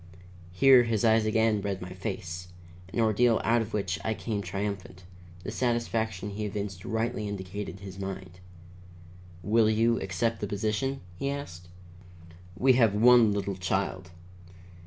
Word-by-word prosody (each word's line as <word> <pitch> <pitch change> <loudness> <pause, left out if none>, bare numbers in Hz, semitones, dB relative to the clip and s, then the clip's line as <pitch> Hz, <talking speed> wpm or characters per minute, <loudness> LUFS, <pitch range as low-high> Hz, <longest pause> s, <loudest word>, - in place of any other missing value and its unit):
Here 130 +8 +7
his 115 -2 0
eyes 110 -1 +4
again 110 -1 +2
read 100 -1 -3
my 90 0 -7
face, 90 -2 -5 0.4
an - - -3
ordeal 115 +1 +3
out 115 +1 +3
of 110 0 -5
which 100 -4 -2
I 110 - -1
came 105 -2 -3
triumphant; 95 -1 -5 0.4
the - - -5
satisfaction 110 -4 -1
he 105 +1 -4
evinced 100 -3 -5
rightly 110 -1 -2
indicated 95 -1 -6
his 95 -1 -9
mind. 95 -2 -6 1.0
"Will 110 +1 +3
you 115 +2 +2
accept 95 +5 -1
the 105 - -3
position?" 110 +7 -2 0.2
he 140 - -1
asked. 90 -12 -6 0.9
"We 130 0 +5
have 115 -5 +3
one 120 0 +6
little 100 -1 -2
child. 95 0 -2
105 Hz, 140 wpm, -28 LUFS, 95-115 Hz, 1.0 s, Here